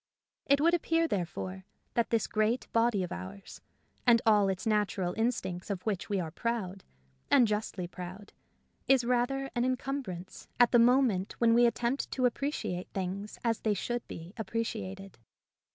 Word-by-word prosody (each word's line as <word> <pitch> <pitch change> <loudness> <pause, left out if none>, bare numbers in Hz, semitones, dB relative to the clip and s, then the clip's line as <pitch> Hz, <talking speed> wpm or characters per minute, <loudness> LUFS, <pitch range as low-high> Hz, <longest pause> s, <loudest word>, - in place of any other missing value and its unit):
It 280 0 +5
would 335 +3 +4
appear, 330 -1 +2
therefore, 185 - -3 0.3
that 235 - +1
this 230 -1 +1
great 220 +3 0
body 230 -4 +3
of 180 - -5
ours 95 +3 -8 0.5
and 235 -1 +7
all 210 -3 +5
its 190 -1 -3
natural 205 -4 +1
instincts, 225 -6 -2
of 195 -3 -3
which 205 -5 -2
we 200 -2 +1
are 165 -3 -3
proud, 200 -2 -3 0.5
and 250 -4 +6
justly 210 -3 -2
proud, 185 +3 -9 0.5
is 265 -2 +5
rather 250 +3 0
an 240 - 0
encumbrance 255 -8 -3
at 245 - +6
the 240 - +6
moment 235 -6 +3
when 230 -1 +3
we 240 +1 +6
attempt 235 +3 -1
to 255 - +1
appreciate 245 -8 -2
things 195 +2 -4
as 230 -2 +1
they 215 -2 +1
should 240 +3 -3
be 165 +3 -9
appreciated. 195 - -4
220 Hz, 155 wpm, -30 LUFS, 190-240 Hz, 0.5 s, and